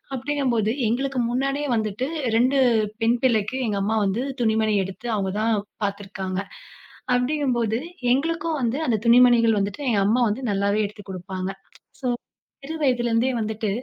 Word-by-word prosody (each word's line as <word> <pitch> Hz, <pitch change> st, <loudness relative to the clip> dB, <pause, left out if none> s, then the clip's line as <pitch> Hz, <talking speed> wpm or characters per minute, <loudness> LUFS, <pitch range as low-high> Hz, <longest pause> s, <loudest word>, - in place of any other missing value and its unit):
அப்படிங்கபோது 255 Hz, -5 st, 0 dB, 0.2 s
எங்களுக்கு 260 Hz, +3 st, -1 dB
முன்னாடியே 275 Hz, +3 st, -1 dB
வந்துட்டு 220 Hz, +3 st, -1 dB, 0.3 s
2 255 Hz, +4 st, +3 dB, 0.4 s
பெண் 235 Hz, +2 st, +3 dB
பிள்ளைக்கு 230 Hz, 0 st, +2 dB
எங்க 205 Hz, -2 st, -1 dB
அம்மா 220 Hz, +2 st, 0 dB
வந்து 210 Hz, +6 st, 0 dB, 0.2 s
துணிமணி 220 Hz, -1 st, +2 dB
எடுத்து 195 Hz, +6 st, -7 dB
அவங்க 190 Hz, -2 st, -1 dB
தான் 225 Hz, 0 st, +2 dB, 0.3 s
பார்த்திருக்காங்க. 195 Hz, -2 st, -3 dB, 0.8 s
அப்படிங்கும் 260 Hz, 0 st, 0 dB
போது 225 Hz, 0 st, 0 dB, 0.3 s
எங்களுக்கும் 325 Hz, +2 st, -1 dB
வந்து 240 Hz, +3 st, 0 dB
அந்த 225 Hz, -, +2 dB
துணிமணிகள் 235 Hz, -2 st, +6 dB
வந்துட்டு 200 Hz, +8 st, -3 dB
எங்க 205 Hz, -4 st, +2 dB
அம்மா 245 Hz, +4 st, +3 dB
வந்து 230 Hz, +6 st, -3 dB
நல்லாவே 200 Hz, +2 st, +1 dB
எடுத்துக் 205 Hz, -1 st, -13 dB
குடுப்பாங்க. 185 Hz, +1 st, -5 dB, 0.5 s
ஸோ -, -, -6 dB, 0.6 s
சிறு 320 Hz, -, -5 dB
வயதிலிருந்தே 240 Hz, -2 st, +2 dB
வந்துட்டு 215 Hz, -1 st, -2 dB
230 Hz, 140 wpm, -23 LUFS, 205-255 Hz, 0.8 s, துணிமணிகள்